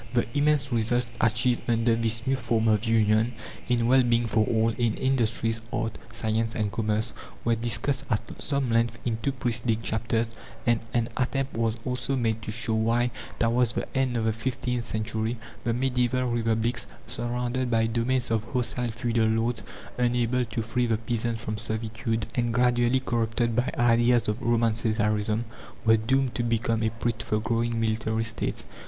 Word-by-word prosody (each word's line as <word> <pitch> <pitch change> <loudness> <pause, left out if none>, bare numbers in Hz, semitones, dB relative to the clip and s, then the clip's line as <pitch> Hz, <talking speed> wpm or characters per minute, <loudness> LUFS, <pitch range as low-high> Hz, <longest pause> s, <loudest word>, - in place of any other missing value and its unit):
The 120 - +3
immense 145 -1 +3
results 120 +1 +1
achieved 120 +2 +1
under 115 0 +3
this 115 0 0
new 135 - +2
form 115 -3 0
of 110 0 +3
union 110 +1 +3 0.4
in 120 -1 +2
well 130 +2 +5
being 120 -1 +2
for 110 -1 +2
all, 115 -1 +2
in 115 -1 0
industries, 115 -3 0
art, 115 -2 -2 0.2
science, 115 0 -1
and 105 -2 -1
commerce 110 +1 0 0.3
were 120 - +3
discussed 120 +4 0
at 110 0 -3
some 140 -4 0
length 115 0 +2
in 115 -2 -1
two 140 - 0
preceding 120 -3 0
chapters, 115 +1 0 0.4
and 120 -2 +3
an 120 -1 0
attempt 135 +1 -1
was 115 0 0
also 125 +2 0
made 115 -3 0
to 110 - -7
show 115 0 0
why, 115 +2 +2 0.3
towards 115 0 +2
the - - -2
end 130 -2 +1
of 115 - 0
the 110 - +2
fifteenth 120 +1 -2
century, 110 +1 -2 0.3
the 120 - +2
medieval 125 0 +1
republics 115 0 0 0.2
surrounded 125 +2 -2
by 115 -1 +3
domains 120 +2 0
of 110 -2 +1
hostile 120 0 -1
feudal 115 -1 0
lords, 115 +1 +1 0.4
unable 125 0 +2
to 115 0 -3
free 120 +2 0
the 115 -1 +2
peasants 115 +1 -2
from 110 0 -3
servitude, 110 +1 -2
and 120 -1 0
gradually 125 0 +3
corrupted 115 -1 0
by 125 +2 +1
ideas 120 0 +4
of 105 +4 -1
Roman 115 -1 +2
Caesarism 110 -1 +1 0.4
were 110 0 +6
doomed 130 +3 +1
to 110 - -1
become 115 -1 0
a 110 - +2
prey 115 +2 -1
to 110 -3 -9
the 105 - +2
growing 115 +1 0
military 110 0 0
States. 115 0 -2
115 Hz, 170 wpm, -27 LUFS, 110-120 Hz, 0.4 s, were